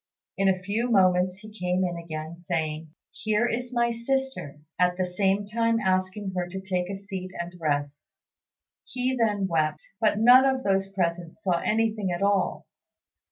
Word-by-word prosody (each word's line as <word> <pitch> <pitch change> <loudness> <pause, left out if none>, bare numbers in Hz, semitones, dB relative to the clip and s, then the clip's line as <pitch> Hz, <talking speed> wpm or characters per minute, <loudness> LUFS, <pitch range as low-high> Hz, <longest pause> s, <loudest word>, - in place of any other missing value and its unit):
In 195 0 +3
a 190 - +2
few 205 +6 -2
moments 185 -3 +3
he 215 +2 -12
came 180 -2 0
in 175 -1 -2
again, 160 -1 -6
saying, 160 -2 -3 0.2
"Here 215 +2 0
is 245 +2 -3
my 235 -1 +2
sister," 265 - -2 0.2
at 180 0 +3
the 185 - +1
same 195 +2 +1
time 230 +2 +1
asking 190 0 0
her 180 -1 -1
to 190 +2 -6
take 185 -1 -2
a 195 - -3
seat 195 -1 -6
and 170 +1 -4
rest. 145 -2 -2 0.7
He 255 +1 -2
then 210 -5 +1
wept; 155 -4 0
but 215 -2 +2
none 245 +4 +7
of 265 -1 +1
those 195 0 +1
present 175 -3 -2
saw 185 -5 0
anything 215 -2 0
at 175 +2 -2
all. 200 -2 +1
190 Hz, 165 wpm, -26 LUFS, 175-220 Hz, 0.7 s, none